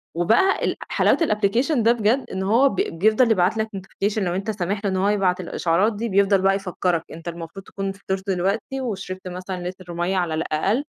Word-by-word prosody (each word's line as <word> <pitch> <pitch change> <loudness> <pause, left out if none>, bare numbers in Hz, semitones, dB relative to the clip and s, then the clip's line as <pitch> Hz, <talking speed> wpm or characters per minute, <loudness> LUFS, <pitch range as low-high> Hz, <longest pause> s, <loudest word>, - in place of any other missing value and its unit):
وبقى 225 - +3
ال - - 0
حلاوة - - +3
الapplication 245 - +1
ده 230 +1 +4
بجد، 240 +3 +1
إن 190 0 -3
هو 235 +8 +4
ب - - -5
بيفضل 215 +8 +2
يبعت 190 +2 +2
لك 220 0 0
notification 195 +2 -3
لو 180 -3 -1
أنت 200 +4 -2
سامح 200 +1 -2
له 200 - +2
إن 190 - -1
هو 195 +2 +2
يبعت 190 -3 +1
الإشعارات 180 +4 +1
دي 230 +2 -3
بيفضل 195 0 +3
بقى 195 0 +3
يفكرك 180 -3 -1
أنت 165 +2 -10
المفروض 170 +3 -7
تكون 195 -1 -4
فطرت 195 0 -5
دلوقتي 200 +8 -1
وشربت 190 -5 -5
مثلًا 180 0 -5
لتر 180 -1 -10
مَيَّة 175 +3 -1
على 175 -3 0
الأقل 165 - 0
195 Hz, 195 wpm, -23 LUFS, 180-215 Hz, -, ده